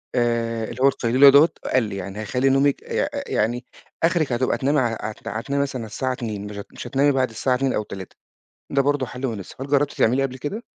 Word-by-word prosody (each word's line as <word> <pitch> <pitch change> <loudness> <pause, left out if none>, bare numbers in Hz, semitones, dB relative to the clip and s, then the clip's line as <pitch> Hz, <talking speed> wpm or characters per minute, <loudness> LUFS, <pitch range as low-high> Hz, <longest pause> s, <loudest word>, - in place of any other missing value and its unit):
آآ، 115 -2 0
اللي 115 +3 -6
هو 135 - +6
القيلُولة 130 +1 +5
دوّة 145 +4 +7 0.2
أقل، 115 -5 +1
يعني 100 +1 -6
هيخلّي 125 +5 +1
نومِك 135 +1 +2
يأ - - -1 0.2
ي - - -4
يعني 120 +3 0 0.4
آخرِك 165 -4 +2
هتبقى 125 +2 +1
تنامي 145 +2 +2
ع 115 -3 0
عت 110 0 -7
هتنامي 140 +6 -2
مثلًا 135 -3 -4
على 110 - -7
الساعة 130 +4 -2
02:00 110 -5 -5
مش 105 0 -8
هت 100 - -7
مش - - -8
هتنامي 140 +1 +3
بعد 130 -2 +1
الساعة 125 +3 0
02:00 135 0 0
أو 105 - 0
03:00 95 -3 -9 0.6
ده 140 0 +2
برضو 145 -1 +1
حل 125 +2 -4
مناسب، 110 +2 -6
هل - - -4
جربتِ 145 0 +2
تعمليه 125 +4 +2
قبل 130 -1 -3
كده؟ 200 - -4
130 Hz, 225 wpm, -23 LUFS, 115-140 Hz, 0.6 s, دوّة